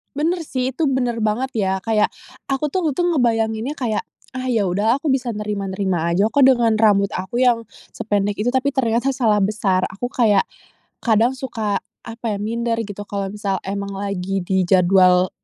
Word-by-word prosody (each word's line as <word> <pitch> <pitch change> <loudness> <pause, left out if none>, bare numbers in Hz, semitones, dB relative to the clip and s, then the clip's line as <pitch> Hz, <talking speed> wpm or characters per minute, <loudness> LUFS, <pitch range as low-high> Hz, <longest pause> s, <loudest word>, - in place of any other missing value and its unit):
Bener 330 +3 0
sih, 255 -2 -3
itu 325 - -1
bener 240 -4 -1
banget 245 +5 0
ya. 190 -3 +1
Kayak, 215 +1 +1 0.4
aku 270 +3 0
tuh 365 +5 -2
untung 350 +3 0
ngebayanginnya 225 0 +1
kayak, 225 -4 -1 0.3
"Ah, 255 0 -3
ya 210 -5 +1
udah 215 +8 +1
aku 310 - -4
bisa 260 -3 +1
nerima-nerima 195 -4 -2
aja 195 +5 +3
kok 275 +4 +3
dengan 240 -4 +4
rambut 205 -2 +4
aku 190 +6 -3
yang 245 -2 +3 0.3
sependek 205 -1 -1
itu," 230 +4 -1
tapi 265 +1 0
ternyata 255 +1 +1
salah 220 -5 +2
besar. 195 -2 +1
Aku 245 +6 -6
kayak, 210 -5 +3 0.5
kadang 235 +3 +2
suka 220 -6 -2 0.3
apa 230 +1 -9
ya, - - -3
minder 230 +2 -1
gitu 205 0 -8
klo 200 -1 -3
misal 200 -2 -2
emang 200 +1 -3
lagi 195 -1 -3
di 190 +1 0
jadwal 180 0 +4
220 Hz, 170 wpm, -20 LUFS, 200-250 Hz, 0.5 s, dengan